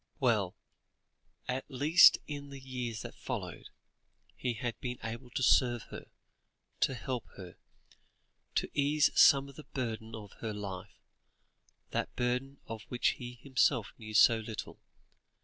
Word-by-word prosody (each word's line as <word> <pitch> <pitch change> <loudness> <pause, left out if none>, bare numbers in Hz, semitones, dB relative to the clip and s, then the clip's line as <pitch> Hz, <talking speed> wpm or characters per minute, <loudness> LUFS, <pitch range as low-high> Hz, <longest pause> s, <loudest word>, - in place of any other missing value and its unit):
Well! 110 -9 +2 0.9
at 130 +3 -3
least 150 +6 +7
in 145 -1 -6
the 140 -1 -9
years 125 -4 -5
that - - -7
followed, - - -6 0.7
he 125 -2 -2
had 120 -2 -4
been 125 -1 -4
able 115 +2 -6
to 130 - -2
serve 120 -2 +4
her, - - -8 0.7
to 135 - +2
help 125 -2 -4
her, 90 -3 -9 1.0
to - - +1
ease 145 +1 +3
some 140 0 +6
of 140 - -14
the 155 - -10
burden 110 -3 -3
of 105 -3 -9
her 110 -2 -4
life, 95 -3 -7 0.9
that - - -2
burden 125 +3 -1
of 110 -1 -6
which 125 - +2
he 125 0 -7
himself 130 -4 +2
knew 110 -1 -7
so 115 +2 +7
little. 110 0 -7
125 Hz, 140 wpm, -32 LUFS, 110-135 Hz, 1.0 s, least